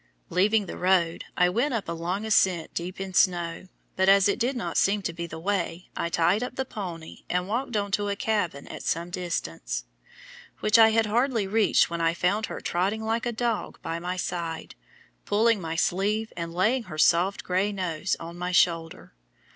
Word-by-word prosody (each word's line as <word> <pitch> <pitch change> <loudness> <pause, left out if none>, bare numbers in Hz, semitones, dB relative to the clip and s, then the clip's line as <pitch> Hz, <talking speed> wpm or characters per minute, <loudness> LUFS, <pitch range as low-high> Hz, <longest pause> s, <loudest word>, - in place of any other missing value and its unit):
Leaving 205 +4 +3
the - - -7
road, 180 -2 +2
I 180 - +5
went 240 +9 0
up 220 - -3
a - - -3
long 175 +5 -3
ascent 185 -6 +2
deep 180 +2 -5
in 190 -1 -5
snow, 175 -1 +1 0.3
but 190 +1 +3
as 195 0 +6
it 200 - 0
did 250 +3 0
not 245 - -4
seem 200 +1 +2
to 170 - -2
be 170 0 -5
the 160 - -8
way, 180 -1 -2
I 170 - -2
tied 170 +5 +2
up 250 0 -4
the 265 - -2
pony, 175 -9 -7
and 180 +1 0
walked 240 +2 -1
on 200 -1 -2
to 205 0 0
a 200 - -1
cabin 200 -10 -1
at - - -8
some 170 +2 -2
distance, 80 - -3 0.7
which 215 +2 +4
I 225 0 +8
had 225 0 +3
hardly 230 0 +1
reached 210 -2 +3
when 170 0 -2
I 165 0 +2
found 200 +5 0
her - - -6
trotting 195 +5 -1
like 225 +2 -1
a - - 0
dog 235 -1 -2
by 165 +1 -3
my 180 +2 -3
side, 170 -2 -4 0.5
pulling 220 0 +2
my 165 -1 -4
sleeve 205 +6 0
and 170 -1 -4
laying 220 +8 +1
her 165 -5 -8
soft 175 +5 +3
gray 190 +3 0
nose 185 -2 -2
on 170 +1 -8
my 180 +1 -2
shoulder. 165 - +1
185 Hz, 195 wpm, -26 LUFS, 170-215 Hz, 0.7 s, I